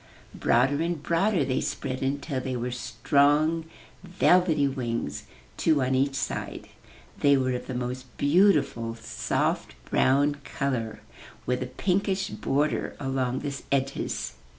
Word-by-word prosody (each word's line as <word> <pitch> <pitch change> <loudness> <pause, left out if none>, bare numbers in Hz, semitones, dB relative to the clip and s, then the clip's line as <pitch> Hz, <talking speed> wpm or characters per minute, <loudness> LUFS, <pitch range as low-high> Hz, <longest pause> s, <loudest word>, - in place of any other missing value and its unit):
Broader 135 +5 +2
and 165 -3 -2
broader 175 -1 +2
they 130 -1 0
spread 130 0 -3
until 140 0 -2
they 130 0 -3
were 125 +1 -2
strong, 145 +7 +2 0.4
velvety 175 -4 +3
wings, 115 - -3 0.3
two 155 -5 +3
on 130 +1 0
each 135 +1 +1
side. 140 - -4 0.5
They 140 -1 +5
were 130 -1 +1
of 125 - -4
the 130 - -4
most 125 0 -5
beautiful 145 - +3
soft 115 0 -2 0.2
brown 145 +2 +3
color, 125 -7 -3 0.4
with 125 +1 0
a 125 - -2
pinkish 190 +7 0
border 145 +3 -1
along 130 -2 -1
the 145 -2 -3 0.2
edges. 135 - -1
135 Hz, 130 wpm, -27 LUFS, 125-150 Hz, 0.5 s, They